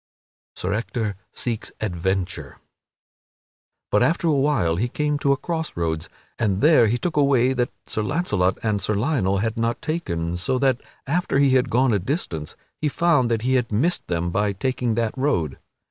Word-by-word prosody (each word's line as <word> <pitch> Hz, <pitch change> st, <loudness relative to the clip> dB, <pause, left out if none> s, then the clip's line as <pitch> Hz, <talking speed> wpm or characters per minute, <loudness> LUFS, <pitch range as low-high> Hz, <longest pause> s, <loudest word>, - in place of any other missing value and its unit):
[Sidenote: 95 Hz, +2 st, -2 dB
Sir -, -, +1 dB
Ector 110 Hz, -3 st, -3 dB, 0.2 s
seeks 115 Hz, -3 st, -4 dB
adventure] 95 Hz, -1 st, -2 dB, 1.3 s
But -, -, +3 dB
after 170 Hz, +1 st, +2 dB
a -, -, +4 dB
while 135 Hz, -, +2 dB
he 115 Hz, +6 st, +1 dB
came 150 Hz, +3 st, -1 dB
to 140 Hz, -, +2 dB
a 140 Hz, -, +3 dB
cross 160 Hz, -, -4 dB
roads, 80 Hz, -1 st, -2 dB, 0.3 s
and 100 Hz, -3 st, +1 dB
there 150 Hz, -4 st, +6 dB
he 115 Hz, +3 st, +1 dB
took 160 Hz, +6 st, -3 dB
a 145 Hz, -, +5 dB
way 130 Hz, -2 st, +3 dB
that 125 Hz, -1 st, 0 dB, 0.2 s
Sir 110 Hz, -, -3 dB
Launcelot 105 Hz, -, 0 dB
and 105 Hz, -3 st, 0 dB
Sir 105 Hz, +3 st, 0 dB
Lionel 105 Hz, -5 st, +1 dB
had 110 Hz, +3 st, -1 dB
not 115 Hz, +1 st, 0 dB
taken; 85 Hz, -, -2 dB
so 130 Hz, +9 st, 0 dB
that, 130 Hz, -1 st, +2 dB, 0.2 s
after 170 Hz, +1 st, 0 dB
he 140 Hz, -1 st, +4 dB
had 130 Hz, -1 st, +3 dB
gone 125 Hz, 0 st, +3 dB
a 100 Hz, -, +2 dB
distance, 90 Hz, -, -3 dB, 0.2 s
he 150 Hz, -, +1 dB
found 145 Hz, -6 st, +2 dB
that 115 Hz, -1 st, 0 dB
he 130 Hz, +1 st, +1 dB
had 125 Hz, -3 st, +1 dB
missed 140 Hz, +13 st, 0 dB
them 85 Hz, 0 st, -1 dB
by 105 Hz, +2 st, +1 dB
taking 125 Hz, +2 st, -1 dB
that 115 Hz, -1 st, -1 dB
road. 130 Hz, -, 0 dB
115 Hz, 185 wpm, -23 LUFS, 95-140 Hz, 1.3 s, there